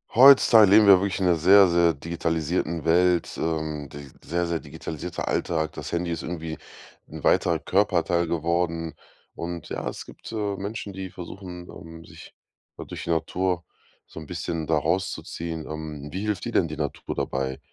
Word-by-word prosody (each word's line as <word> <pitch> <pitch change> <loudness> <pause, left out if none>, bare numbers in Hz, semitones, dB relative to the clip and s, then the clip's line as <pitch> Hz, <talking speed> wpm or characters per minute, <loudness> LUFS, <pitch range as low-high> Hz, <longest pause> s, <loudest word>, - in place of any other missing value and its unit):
Heutzutage 120 -6 +8
leben 105 0 +7
wir 95 -2 +9
wirklich 100 0 -2
in 95 - +1
'ner 90 - +4
sehr, 95 +4 +7
sehr 85 -1 +3
digitalisierten 85 +1 -2
Welt. 90 +1 +2
Ähm. 80 -3 -3
D 70 0 -10 0.2
sehr, 85 +1 -1
sehr 85 -1 -1
digitalisierter 80 +3 -6
Alltag. 80 -2 -1
Das - - -7
Handy 85 0 -1
ist 85 -1 -3
irgendwie 80 -2 -5 0.5
'n - - -9
weiterer 85 -2 +3
Körperteil 85 -2 +1
geworden. 85 0 -1 0.4
Und 85 -2 -6
ja, - - -4
es - - -6
gibt, - - -11
äh, 105 -3 -2
Menschen, 100 +1 -5
die 95 -1 -6
versuchen, 90 0 -9
ähm, 80 0 -11
sich - - -14 0.4
da - - -8
durch - - -7
die 85 - -2
Natur 90 +2 -1 0.4
so - - -10
'n 80 - -9
bisschen 85 0 -4
da 80 0 +2
rauszuziehen. 85 -1 -3
Ähm. 75 -2 -6
Wie 95 - -4
hilft 105 -3 -2
dir - - -4
denn 85 - +3
die 75 -1 -7
Natur 75 -2 -4
dabei? 65 0 -2
85 Hz, 175 wpm, -25 LUFS, 80-95 Hz, 0.5 s, wir